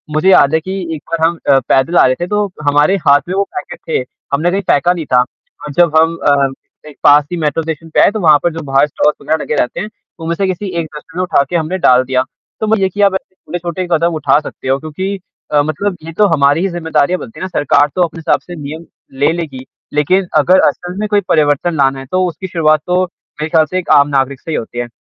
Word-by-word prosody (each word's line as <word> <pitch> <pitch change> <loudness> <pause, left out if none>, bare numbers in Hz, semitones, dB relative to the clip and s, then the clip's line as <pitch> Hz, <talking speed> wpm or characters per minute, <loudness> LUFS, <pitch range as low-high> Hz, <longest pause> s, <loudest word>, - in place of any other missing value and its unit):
मुझे 160 +5 +3
याद 160 -5 +5
है 160 - +3
कि 190 +4 -5 0.2
एक 150 - -9
बार 165 -1 +2
हम 170 0 -4
अ, 135 - +6
पैदल 135 +6 +2
आ - - +6
रहे 130 - +2
थे, 175 - -1
तो 210 +2 0 0.2
हमारे 145 +6 +3
हाथ 140 0 +6
में 185 - -2
वो 200 - +2
पैकेट 485 +6 -6
थे, 445 - +1 0.3
हमने 160 +5 +1
कहीं 195 +2 0
फेंका 175 +5 +3
नहीं 170 -3 -5
था 125 - +6
और 145 +3 -9
जब 170 -3 +4
हम 165 +1 +2
अ, 140 -1 +2 0.4
एक 145 - -16
पास 145 +1 +6
ही 175 - -2
मेट्रो 155 0 -1
स्टेशन 160 0 -6
पे - - +1
आए, - - +5
तो 215 - -4
वहाँ 155 -6 +5
पर 175 -2 +1
जो 165 - -5
बाहर 135 +2 +4
स्टॉल्स 150 +1 +1
वग़ैरह 160 -1 -1
लगे 150 - -2
रहते 125 +1 -1
हैं, 210 +4 -4 0.3
उनमें 165 +1 -2
से 195 +1 -1
किसी 200 +3 -7
एक 165 - -2
डस्टबिन 165 +4 -9
में - - +1
उठा 175 -6 +2
के - - -3
हमने 170 +2 -1
डाल 125 0 +5
दिया। 130 0 +1 0.4
तो 220 - -1
म 220 0 +2
ये 190 -1 +1
कि 205 +3 -4
अब 200 -1 +4
उन्हें 185 -2 -6
छोटे 175 +1 -4
ही 180 - -3
कदम 170 +1 +2
उठा 145 -2 +2
सकते 155 - -9
हो 135 - +2
क्योंकि 185 +7 -4 0.3
अ, 145 -1 +4
मतलब 180 +6 -2
ये 165 - -7
तो 210 - +5
हमारी 145 +1 +3
ही 195 - +1
ज़िम्मेदारियाँ 175 +1 0
बनती 225 - -10
है - - -5
ना, - - -2
सरकार 145 0 +3
तो 180 - +3
अपने 165 -1 -4
हिसाब 160 - +1
से 175 - -10
नियम 155 +4 -7 0.3
ले 145 - +3
लेगी, 145 -7 -6 0.3
लेकिन 180 +6 +1
अगर 185 +1 +4
असल 180 0 -3
में 215 - -1
कोई 205 -1 +2
परिवर्तन 155 +2 +2
लाना 135 -1 +2
है, 135 - -9
तो 185 +6 0
उसकी 175 +3 -6
शुरुआत 155 -3 +2
तो 180 +1 +2
मेरे 155 -3 -9
ख़्याल 160 -1 +3
से 185 - 0
एक 180 - -8
आम 140 - +3
नागरिक 135 -1 0
से 165 - -7
ही - - -1
होती 120 +1 -5
है। 120 - -3
165 Hz, 260 wpm, -15 LUFS, 145-180 Hz, 0.4 s, अ